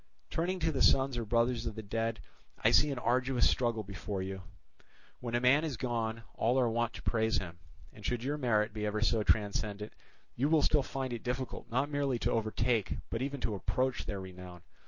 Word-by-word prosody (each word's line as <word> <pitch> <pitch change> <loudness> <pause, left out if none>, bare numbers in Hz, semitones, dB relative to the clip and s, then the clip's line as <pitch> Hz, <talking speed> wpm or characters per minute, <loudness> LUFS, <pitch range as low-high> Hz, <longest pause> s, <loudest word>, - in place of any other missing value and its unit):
"Turning 180 +3 0
to 160 -2 +1
the 135 - -1
sons 135 -1 +4
or 120 - -1
brothers 115 +1 +1
of 110 - -4
the 110 - -6
dead, 115 +2 -2 0.4
I - - +6
see 150 - +5
an 140 - -2
arduous 125 +1 +2
struggle 120 -3 +1
before 100 0 -4
you. 95 0 -5 0.8
When 120 -1 -3
a - - +3
man 130 +5 +5
is 150 -7 -2
gone, 115 -1 -2
all 125 +4 +2
are 125 - +3
wont 120 0 0
to - - -9
praise 110 -2 +1
him, 85 -3 -5 0.3
and - - -14
should 120 -1 -1
your 145 +3 -1
merit 110 -4 +2
be 105 -1 -4
ever 105 +1 -1
so 115 0 +3
transcendent, 105 0 0 0.4
you 140 +5 +1
will 160 -2 +4
still 150 - +4
find 130 -1 -4
it 115 - -4
difficult 125 -1 -4
not 130 +5 0
merely 140 -3 +1
to - - 0
overtake, 110 -1 0
but 115 - -2
even 140 0 -3
to 110 - -1
approach 130 +6 -1
their 100 - -3
renown. 90 -2 -10
115 Hz, 205 wpm, -32 LUFS, 110-130 Hz, 0.8 s, I